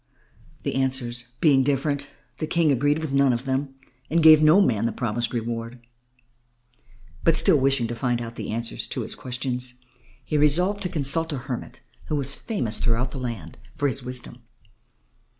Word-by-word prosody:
The - - -2
answers 130 -2 -1 0.2
being 140 -5 +5
different, 140 +1 0 0.3
the 155 - -2
King 165 -2 +2
agreed 145 +3 +2
with 160 -3 -4
none 140 -1 +4
of 120 +2 -2
them 135 +1 -2 0.3
and 165 +1 +2
gave 155 -1 +9
no 155 +5 +6
man 115 - +2
the - - -1
promised 120 0 -2
reward. 115 0 -4 1.4
But 165 - +4
still 155 - +5
wishing 135 -2 +2
to 115 - -3
find 120 0 -1
out 115 -1 -6
the - - -6
answers 115 +1 -2
to - - -3
his - - +1
questions, 125 0 -3 0.5
he 150 - 0
resolved 180 +8 +2
to 180 - -1
consult 160 +2 0
a - - -2
hermit 125 -1 -6 0.2
who 155 - -2
was 140 -1 -1
famous 135 - -3
throughout 125 +2 0
the 135 - -6
land 115 -9 -6 0.2
for 145 - +1
his 135 0 -2
wisdom. 125 -1 -6
135 Hz, 170 wpm, -24 LUFS, 120-150 Hz, 1.4 s, gave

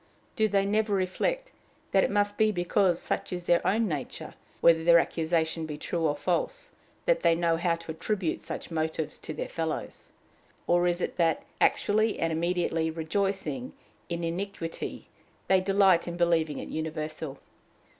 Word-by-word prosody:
Do 220 -1 +3
they 200 -1 +2
never 210 0 +1
reflect - - -1 0.4
that 195 - +4
it - - +1
must 205 0 +1
be 215 0 +3
because 175 -1 +2
such - - -3
is 180 -1 -4
their 175 0 +3
own 220 +3 +2
nature, 150 -7 -5 0.3
whether 165 -1 +5
their 170 0 +7
accusation 160 -1 0
be 150 -1 -5
true 165 +1 -1
or 145 - 0
false, 185 - -2 0.3
that - - +3
they 165 - +4
know 165 -1 +2
how 170 0 +1
to 165 -1 -8
attribute 185 +1 -2
such - - -6
motives 160 -1 -2
to - - -7
their - - -4
fellows? 160 -1 -4 0.5
Or 175 0 +3
is 175 0 0
it - - -3
that, 165 -2 +2 0.2
actually 215 +1 +2
and 165 -1 0
immediately 165 -1 0
rejoicing 195 - -2 0.4
in 170 0 -3
iniquity, 170 0 -4 0.4
they 190 -1 +4
delight 195 -2 +4
in 170 0 -4
believing 165 -4 +2
it - - -6
universal? 155 -2 -4
175 Hz, 160 wpm, -28 LUFS, 160-195 Hz, 0.5 s, their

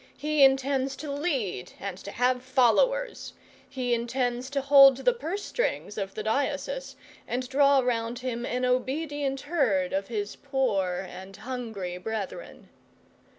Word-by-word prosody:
He 300 -1 +2
intends 270 0 +3
to 295 0 -6
lead, 275 - -2
and 200 -2 -4
to 200 - -8
have 250 +3 +1
followers; 275 - +2 0.4
he 250 -2 -1
intends 245 +1 -1
to 280 0 -1
hold 275 -1 +8
the - - +2
purse 400 -3 -4
strings 485 - -2
of 195 -1 -4
the 215 - -4
diocese, 285 - -2 0.3
and 250 +1 -2
draw 275 +1 +4
round 235 -1 -1
him 245 -1 -4
an 250 +1 -1
obedient 275 +2 -1
herd 240 - +1
of 195 +1 -1
his 210 -3 -3
poor 200 -10 -1
and 190 +2 -10
hungry 220 -7 -5
brethren. 220 - -6
255 Hz, 140 wpm, -27 LUFS, 220-280 Hz, 0.4 s, hold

